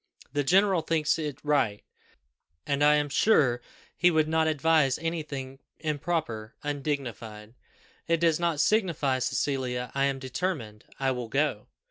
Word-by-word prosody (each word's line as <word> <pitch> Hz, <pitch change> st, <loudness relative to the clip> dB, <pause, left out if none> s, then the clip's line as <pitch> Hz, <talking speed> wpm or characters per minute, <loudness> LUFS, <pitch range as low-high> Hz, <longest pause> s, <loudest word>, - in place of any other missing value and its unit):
"The 145 Hz, -, +1 dB
general 190 Hz, +3 st, +3 dB
thinks 160 Hz, -1 st, +1 dB
it 150 Hz, -4 st, -4 dB
right, 135 Hz, -9 st, +1 dB, 0.8 s
and 140 Hz, 0 st, 0 dB
I 150 Hz, 0 st, +6 dB
am 150 Hz, 0 st, +1 dB
sure 140 Hz, -, +3 dB, 0.3 s
he 180 Hz, -, +4 dB
would 160 Hz, -2 st, +2 dB
not 160 Hz, 0 st, +2 dB
advise 155 Hz, -3 st, +2 dB
any 165 Hz, 0 st, -2 dB
thing 135 Hz, -3 st, -7 dB, 0.2 s
improper 150 Hz, -7 st, -3 dB
undignified. 130 Hz, -7 st, -4 dB, 0.5 s
It 165 Hz, 0 st, +2 dB
does 165 Hz, -1 st, +2 dB
not 170 Hz, -3 st, 0 dB
signify, 155 Hz, -8 st, +2 dB
Cecilia, 125 Hz, -2 st, -1 dB
I 135 Hz, 0 st, +2 dB
am 135 Hz, -1 st, 0 dB
determined 130 Hz, -, -4 dB
I 135 Hz, -1 st, +1 dB
will 125 Hz, -2 st, -4 dB
go." 135 Hz, -5 st, 0 dB
145 Hz, 140 wpm, -27 LUFS, 130-160 Hz, 0.8 s, I